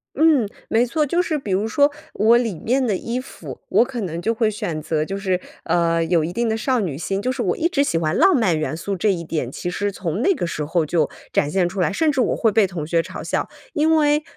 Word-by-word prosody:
嗯， 305 -8 +4 0.2
没 230 +2 +3
错， 300 +5 0
就 345 +5 +2
是 315 -3 -1
比 215 -7 -5
如 195 +4 +1
说 285 +6 +3 0.2
我 225 +3 +5
里 225 -9 -2
面 255 +3 +1
的 215 -5 +1
衣 230 +6 -3
服， 255 - -9
我 - - +5
可 250 -2 -5
能 170 -3 -4
就 225 - +1
会 225 -1 +1
选 170 -6 -3
择 155 0 -1
就 195 +5 -4
是， 185 -2 -1 0.2
呃， 165 -1 +1
有 165 -1 +2
一 165 - -3
定 235 +5 -1
的 220 - +1
少 255 +2 +1
女 175 -10 -2
心。 195 +5 -2
就 250 +4 0
是 260 -1 -3
我 - - 0
一 330 - +2
直 285 -6 +2
喜 170 - 0
欢 160 0 0
浪 375 +2 +5
漫 185 -9 +2
元 155 0 -2
素， 195 +4 -3
这 200 +3 +2
一 170 -3 -3
点 155 -6 -3
其 175 - -4
实 205 +2 -1
从 185 0 -3
那 390 - +3
个 - - -2
时 155 -2 -3
候 160 +1 0
就 155 -1 +1 0.2
展 145 - +1
现 180 +1 +1
出 190 +3 -5
来， 180 - +2
甚 305 +9 +2
至 270 - +1
我 - - +1
会 225 - +2
被 205 -1 +4
同 170 -5 -5
学 165 +1 +1
嘲 - - -8
笑。 - - -2 0.2
因 315 0 +3
为， 300 -1 +3
200 Hz, 285 characters per minute, -21 LUFS, 170-255 Hz, 0.2 s, 我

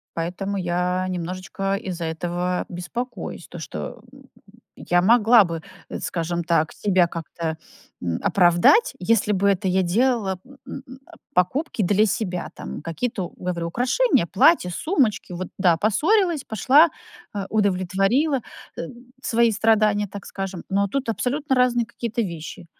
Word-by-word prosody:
Поэтому 185 +4 -3
я 180 +1 -1
немножечко 185 +2 -3
из-за 180 -3 -5
этого 175 +2 -2
беспокоюсь, 235 +8 -6
то, - - -9
что - - -7
м - - -15
м - - -19 0.6
я 175 0 +3
могла 225 +2 +6
бы, 165 -2 -5 0.3
э, - - -4
скажем 170 0 -2
так, 160 -2 +1
себя 185 -4 +2
как-то, 165 -1 -5 0.5
м, 85 -2 -1
оправдать, 180 - +4
если 210 +2 +1
бы 200 0 +2
это 190 -1 0
я 190 +1 +2
делала 205 0 +1
м 275 +1 -17
м 270 - -7
м, 260 +1 -11
а - - -19 0.2
покупки 215 - +1
для 205 +3 +3
себя. 185 -4 -2
Там 65 +1 -7
какие-то, 185 +2 -3
говорю: 170 -2 -3
украшения, 255 - +2
платья, 315 - +4
сумочки, 230 - 0
вот 180 +1 -5
да, 175 -3 +4
поссорилась, 325 - +2
пошла, 275 - +5 0.4
а 200 -1 -4
удовлетворила, 205 - +1 0.4
э, - - -2 0.4
свои 235 0 +3
страдания, 210 -1 +2
так 200 +1 -9
скажем. 195 -2 -5
Но 200 +1 +1
тут 265 +5 -3
абсолютно 265 +5 -1
разные 245 -2 +2
какие-то 235 +1 -3
вещи. 170 -1 -7
195 Hz, 145 wpm, -23 LUFS, 175-235 Hz, 0.6 s, могла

